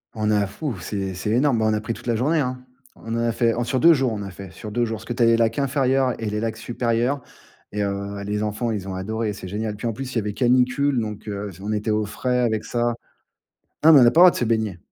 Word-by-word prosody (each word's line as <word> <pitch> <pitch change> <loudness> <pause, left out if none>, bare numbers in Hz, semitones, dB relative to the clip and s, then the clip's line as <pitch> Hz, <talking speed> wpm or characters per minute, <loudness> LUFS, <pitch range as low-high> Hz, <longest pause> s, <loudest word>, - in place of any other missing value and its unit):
On 110 -1 0
a 105 -1 +2
ouf, 130 - -3
c'est 95 +2 -3
c'est 95 +3 -4
énorme. 125 +1 +2
Bah, 110 - +1
on - - +1
a 105 - -1
pris 115 +1 -3
toute - - -11
la 120 - +1
journée, 150 +8 +1
hein. 125 -2 -3 0.3
On 115 - -7
en - - -1
a 115 0 +1
fait 115 0 +1
sur 130 +2 -1
2 165 +3 +7
jours. 135 -5 +1
On 105 -2 -4
a 100 - -7
fait 95 0 -10
sur 105 +2 -9
2 120 +3 0
jours 110 -1 -2
parce 110 - -12
que 120 - -3
tu 120 - -4
as - - +6
les 115 0 +5
lacs 115 +2 +1
inférieurs 135 -2 +1
et - - -3
les 105 +1 -2
lacs 110 0 -3
supérieurs 120 +3 -1 0.5
et 105 0 -1
heu, 100 0 -3
les 105 +1 -2
enfants, 110 +3 -2
ils 100 -3 -4
ont 95 - -4
adoré. 110 +3 -2
C'est 95 - -8
génial. 105 +2 -3
Puis, 105 - -7
en 115 - -1
plus, 130 +3 -6
il - - -10
y - - +4
avait 105 -1 -3
canicule, 125 +3 +2
donc, 105 -1 -5
heu, 100 0 -4
s 90 -1 -13
on 105 +2 -4
était 105 +1 -1
au 105 0 +1
frais 125 +5 -1
avec 110 -3 0
ça. 120 -1 0 0.9
Ah 160 +1 +8
mais 145 - +9
on 120 - +7
a - - +7
pas 165 - +3
le - - +10
droit 180 - +10
de - - -7
se - - 0
baigner. 110 -5 0
115 Hz, 295 wpm, -23 LUFS, 105-125 Hz, 0.9 s, le